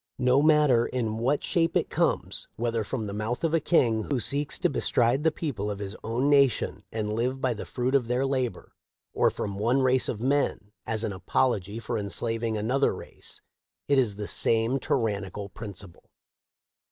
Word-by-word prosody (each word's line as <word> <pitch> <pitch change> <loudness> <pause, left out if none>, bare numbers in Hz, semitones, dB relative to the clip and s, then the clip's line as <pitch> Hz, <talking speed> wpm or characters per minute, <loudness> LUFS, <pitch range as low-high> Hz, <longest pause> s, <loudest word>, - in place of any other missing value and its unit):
No 125 +2 +3
matter 150 -6 +4
in 110 -3 -2
what 135 +5 +1
shape 165 -1 +1
it - - -2
comes, - - 0
whether 115 -1 -1
from 110 +1 -4
the 100 - -5
mouth 110 +6 -3
of 165 -1 +1
a 165 - +4
king 120 -9 +2
who 140 -4 -1
seeks 145 +4 0
to - - +2
bestride 125 -1 +1
the 160 - +5
people 130 -11 -3
of 100 - -3
his 100 +1 -5
own 120 +5 0
nation 140 -4 +2
and 105 -1 -2
live 125 +4 -1
by 130 -2 0
the 110 - -7
fruit 125 +1 -2
of 135 -4 +2
their 125 +3 +1
labor, 130 -3 -2 0.4
or - - +3
from 100 -1 -5
one 125 +5 +2
race 130 0 +3
of 105 - -3
men 130 -5 0 0.2
as 110 0 -1
an 110 -3 -2
apology 100 +1 0
for 115 0 -3
enslaving 115 +3 -2
another 125 +6 +1
race, - - -9 0.5
it 140 -1 +4
is 110 -6 +1
the 105 0 -5
same 115 +4 +2
tyrannical 105 - -2
principle." 100 -3 -10
120 Hz, 180 wpm, -27 LUFS, 105-135 Hz, 0.5 s, the